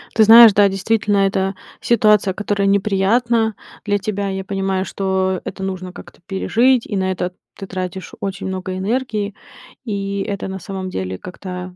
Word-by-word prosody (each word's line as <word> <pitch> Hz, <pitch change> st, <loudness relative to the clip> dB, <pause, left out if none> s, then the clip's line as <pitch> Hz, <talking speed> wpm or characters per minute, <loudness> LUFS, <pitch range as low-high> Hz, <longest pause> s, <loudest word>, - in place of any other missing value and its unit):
Ты 220 Hz, -, +6 dB
знаешь, 225 Hz, -1 st, +9 dB
да, 205 Hz, 0 st, +5 dB
действительно, 205 Hz, +1 st, 0 dB
это 190 Hz, 0 st, -1 dB, 0.3 s
ситуация, 210 Hz, -4 st, +3 dB
которая 205 Hz, -1 st, -1 dB
неприятна 215 Hz, +3 st, +2 dB, 0.3 s
для 205 Hz, 0 st, +1 dB
тебя. 200 Hz, 0 st, -3 dB
Я 190 Hz, 0 st, -3 dB
понимаю, 195 Hz, -1 st, -2 dB
что 190 Hz, -1 st, -1 dB
это 190 Hz, 0 st, -6 dB
нужно 185 Hz, -1 st, -5 dB
как-то 175 Hz, -, -13 dB
пережить, 235 Hz, +6 st, +2 dB
и 205 Hz, -, -4 dB
на 190 Hz, 0 st, 0 dB
это 180 Hz, 0 st, -3 dB, 0.2 s
ты 195 Hz, -, -8 dB
тратишь 185 Hz, 0 st, -5 dB
очень 195 Hz, -1 st, -4 dB
много 185 Hz, 0 st, -4 dB
энергии. 215 Hz, -1 st, -2 dB, 0.5 s
И 200 Hz, -2 st, -3 dB
это 200 Hz, 0 st, -4 dB
на 190 Hz, 0 st, -5 dB
самом 190 Hz, +1 st, -6 dB
деле 95 Hz, -, -4 dB
как-то 180 Hz, 0 st, -8 dB
195 Hz, 160 wpm, -19 LUFS, 190-210 Hz, 0.5 s, знаешь